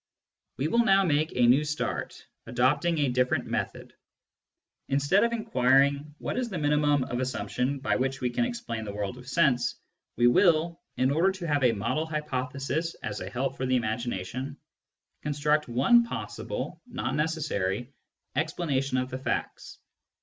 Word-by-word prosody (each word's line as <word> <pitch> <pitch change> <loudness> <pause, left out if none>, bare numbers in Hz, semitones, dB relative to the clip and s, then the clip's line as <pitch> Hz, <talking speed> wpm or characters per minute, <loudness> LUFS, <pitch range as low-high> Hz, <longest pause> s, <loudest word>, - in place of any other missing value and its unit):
We 140 - 0
will 235 +8 +3
now 195 -3 +5
make 155 -2 +1
a 125 - +4
new 130 +5 +5
start, 150 +1 -3 0.2
adopting 145 +7 +2
a 145 -3 +2
different 125 0 +1
method. - - -4 1.0
Instead 140 +9 +3
of 235 - +2
inquiring 140 - +2
what - - -3
is 245 -2 -2
the 190 - -4
minimum 145 -2 +2
of 125 -1 -3
assumption 130 +1 -1
by 135 - 0
which 135 +1 -1
we 125 -2 -1
can 240 - +1
explain 235 - -3
the 100 -2 -6
world 105 +4 -4
of 125 - -13
sense, 140 -4 +2 0.4
we 120 - +2
will, 165 +5 +4 0.2
in 130 +1 +2
order 170 +6 +3
to 185 -3 -6
have 145 -3 +1
a 120 -2 +5
model 130 +10 -1
hypothesis 140 +1 -2
as 105 -1 -3
a 90 - -5
help 130 +5 -2
for 130 - -2
the 130 - +2
imagination, 120 +3 -3 0.6
construct 150 +1 +1
one 135 - +5
possible 235 - -5
(not - - -3
necessary) 140 - -1 0.4
explanation 140 -4 0
of 130 0 -2
the 130 - -4
facts. 130 - -3
140 Hz, 155 wpm, -28 LUFS, 125-155 Hz, 1.0 s, now